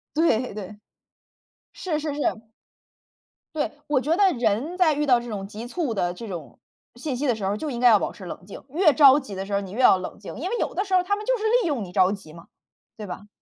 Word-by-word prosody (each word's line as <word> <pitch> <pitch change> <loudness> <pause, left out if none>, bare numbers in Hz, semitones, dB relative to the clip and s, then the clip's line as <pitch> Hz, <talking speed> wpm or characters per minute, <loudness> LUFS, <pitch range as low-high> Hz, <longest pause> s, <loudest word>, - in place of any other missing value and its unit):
对 255 -8 +2
对。 205 0 -8 1.0
是 330 -5 -2
是 300 -2 -3
是。 295 - -5 1.4
对， 300 - -1 0.2
我 290 -4 +2
觉 300 +6 +1
得 390 -3 +4
人 235 - 0
在 350 -4 +4
遇 295 +1 0
到 250 -4 +5
这 240 - -8
种 200 -3 -5
急 215 +3 -8
促 275 0 -2
的 175 -4 -1
这 225 +5 -9
种 170 -6 -8 0.4
信 260 +2 -4
息 275 +4 -2
的 250 - +3
时 205 - -5
候 195 - +1
儿 205 - -2
就 300 +4 -4
应 235 - -4
该 250 - +5
要 220 -3 +7
保 - - -2
持 190 - -11
冷 180 - -8
静， 195 - -10
越 310 +3 +4
着 280 -2 +7
急 265 -9 -6
的 190 0 -4
时 200 - -6
候 200 - +2
儿 - - -5
你 190 -2 -8
越 220 - -6
要 190 - +7
冷 185 - -7
静， 200 - -9
因 340 +9 -3
为 475 - -1
有 - - -2
的 390 - 0
时 390 - -5
候 370 - +6
儿 - - 0
他 405 - +1
们 420 +1 -7
就 - - +2
是 430 - -7 0.2
利 390 - -1
用 275 -6 -1
你 180 - -12
着 185 -1 +4
急 195 -7 -8
嘛， 170 0 -14 0.5
对 210 - -7
吧。 205 +3 -8
245 Hz, 290 characters per minute, -24 LUFS, 200-310 Hz, 1.4 s, 要